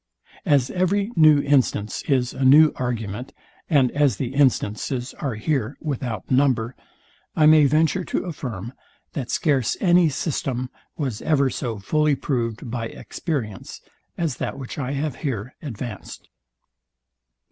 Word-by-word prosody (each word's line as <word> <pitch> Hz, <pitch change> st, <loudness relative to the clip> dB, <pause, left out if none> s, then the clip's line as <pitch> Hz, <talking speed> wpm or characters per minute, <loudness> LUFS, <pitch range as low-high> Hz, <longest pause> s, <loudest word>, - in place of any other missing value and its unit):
As 135 Hz, -3 st, +3 dB
every 195 Hz, +4 st, 0 dB
new 155 Hz, -3 st, +6 dB
instance 130 Hz, -7 st, +1 dB
is 130 Hz, -4 st, +1 dB
a 135 Hz, -, -3 dB
new 150 Hz, +4 st, +7 dB
argument, 120 Hz, -1 st, -4 dB, 0.4 s
and 140 Hz, -6 st, +4 dB
as 145 Hz, -2 st, +2 dB
the 130 Hz, -1 st, -3 dB
instances 130 Hz, -2 st, 0 dB
are 135 Hz, -6 st, -2 dB
here 130 Hz, +2 st, -1 dB
without 125 Hz, -, -4 dB
number, 130 Hz, -3 st, +2 dB, 0.6 s
I 155 Hz, -, +4 dB
may 155 Hz, -1 st, +7 dB
venture 160 Hz, +5 st, +2 dB
to -, -, -2 dB
affirm, 120 Hz, -, -6 dB, 0.4 s
that 130 Hz, -5 st, -4 dB
scarce 135 Hz, -8 st, +1 dB
any 175 Hz, -2 st, +4 dB
system 130 Hz, -4 st, -3 dB, 0.3 s
was 130 Hz, -8 st, -3 dB
ever 140 Hz, -4 st, +2 dB
so 115 Hz, -4 st, -3 dB
fully 150 Hz, +8 st, +1 dB
proved 120 Hz, -3 st, -3 dB
by 115 Hz, -2 st, -3 dB
experience, 115 Hz, -, -5 dB, 0.4 s
as 160 Hz, -7 st, -1 dB
that -, -, -4 dB
which 135 Hz, +1 st, -7 dB
I 135 Hz, 0 st, -2 dB
have 140 Hz, -2 st, -2 dB
here 125 Hz, -5 st, -4 dB
advanced. 120 Hz, -6 st, -7 dB
135 Hz, 135 wpm, -23 LUFS, 120-150 Hz, 0.6 s, new